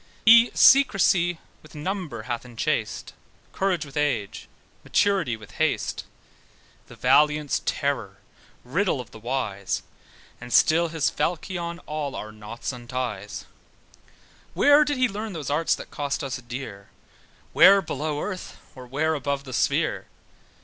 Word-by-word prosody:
He 230 Hz, +1 st, +8 dB
secrecy 195 Hz, -10 st, +5 dB, 0.2 s
with 155 Hz, -, -17 dB
number 155 Hz, -, -4 dB
hath 120 Hz, -1 st, -4 dB
enchased, 120 Hz, -2 st, -3 dB, 0.4 s
Courage 185 Hz, -5 st, 0 dB
with 140 Hz, -, -14 dB
age, 135 Hz, -9 st, -2 dB, 0.4 s
maturity 190 Hz, -, +1 dB
with 110 Hz, -1 st, -14 dB
haste: -, -, -1 dB, 0.8 s
The -, -, -13 dB
valiant's 150 Hz, -1 st, +3 dB
terror, 125 Hz, -10 st, -2 dB, 0.5 s
riddle 165 Hz, +4 st, 0 dB
of 120 Hz, -2 st, -8 dB
the 110 Hz, -, -12 dB
wise, 105 Hz, -5 st, -3 dB, 0.6 s
And 125 Hz, -, -9 dB
still 165 Hz, +7 st, +4 dB
his 160 Hz, -2 st, 0 dB
falchion 170 Hz, 0 st, -3 dB
all 150 Hz, -2 st, -4 dB
our 110 Hz, -, -6 dB
knots 110 Hz, +4 st, -6 dB
unties. 120 Hz, -4 st, -5 dB, 1.1 s
Where 290 Hz, +1 st, +6 dB
did 290 Hz, -2 st, -2 dB
he 255 Hz, 0 st, +3 dB
learn 210 Hz, 0 st, -5 dB
those 150 Hz, -4 st, -5 dB
arts 160 Hz, +3 st, +2 dB
that -, -, -11 dB
cost 145 Hz, 0 st, -3 dB
us 135 Hz, -2 st, -3 dB
dear? 120 Hz, -5 st, -8 dB, 0.6 s
Where 195 Hz, +1 st, +8 dB
below 150 Hz, -3 st, -3 dB
earth, 190 Hz, -3 st, -6 dB, 0.2 s
or 130 Hz, -1 st, -11 dB
where 155 Hz, +5 st, 0 dB
above 140 Hz, -1 st, -2 dB
the 130 Hz, -2 st, -9 dB
sphere? -, -, 0 dB
145 Hz, 130 wpm, -25 LUFS, 125-175 Hz, 1.1 s, He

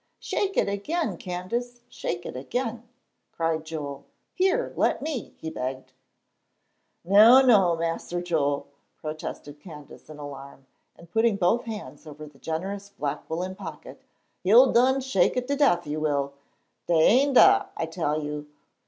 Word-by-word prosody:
"Shake 390 Hz, -1 st, -2 dB
it -, -, +3 dB
again, 205 Hz, -, -2 dB
Candace! 235 Hz, +8 st, -5 dB
Shake 175 Hz, -8 st, -5 dB
it -, -, -6 dB
again!" 230 Hz, -, -4 dB, 0.4 s
cried 165 Hz, -1 st, -1 dB
Joel. 145 Hz, -3 st, -6 dB, 0.3 s
"Here, 385 Hz, +7 st, +1 dB
let -, -, +1 dB
me," 300 Hz, -8 st, -5 dB
he 160 Hz, -, -6 dB
begged. 130 Hz, -2 st, -5 dB, 1.1 s
"No, 220 Hz, +8 st, +8 dB
no, 195 Hz, -9 st, +5 dB
Mas'r 165 Hz, +1 st, -3 dB
Joel," 155 Hz, -5 st, -1 dB, 0.3 s
protested 155 Hz, -1 st, -7 dB
Candace, 150 Hz, -4 st, -13 dB
in 155 Hz, -, -10 dB
alarm, 140 Hz, -2 st, -10 dB, 0.3 s
and 170 Hz, 0 st, -17 dB
putting 225 Hz, 0 st, +2 dB
both 200 Hz, +5 st, +1 dB
hands 215 Hz, -7 st, -8 dB
over 150 Hz, 0 st, -9 dB
the 145 Hz, -2 st, -16 dB
generous 195 Hz, +5 st, -4 dB
black 150 Hz, -8 st, -5 dB
woollen 180 Hz, +3 st, -3 dB
pocket, 205 Hz, -, -10 dB, 0.4 s
"you'll 235 Hz, +7 st, +6 dB
done 260 Hz, +3 st, +4 dB
shake 265 Hz, -1 st, +1 dB
it 250 Hz, 0 st, -1 dB
to 285 Hz, -, +1 dB
def, 265 Hz, -12 st, +3 dB
you 150 Hz, +1 st, -3 dB
will. 140 Hz, -2 st, -1 dB, 0.5 s
Dey 175 Hz, -, +2 dB
ain' 275 Hz, +4 st, +4 dB
dah, 395 Hz, +9 st, +6 dB
I -, -, -1 dB
tell 155 Hz, -2 st, -2 dB
you. 150 Hz, 0 st, -5 dB
175 Hz, 145 wpm, -26 LUFS, 150-240 Hz, 1.1 s, No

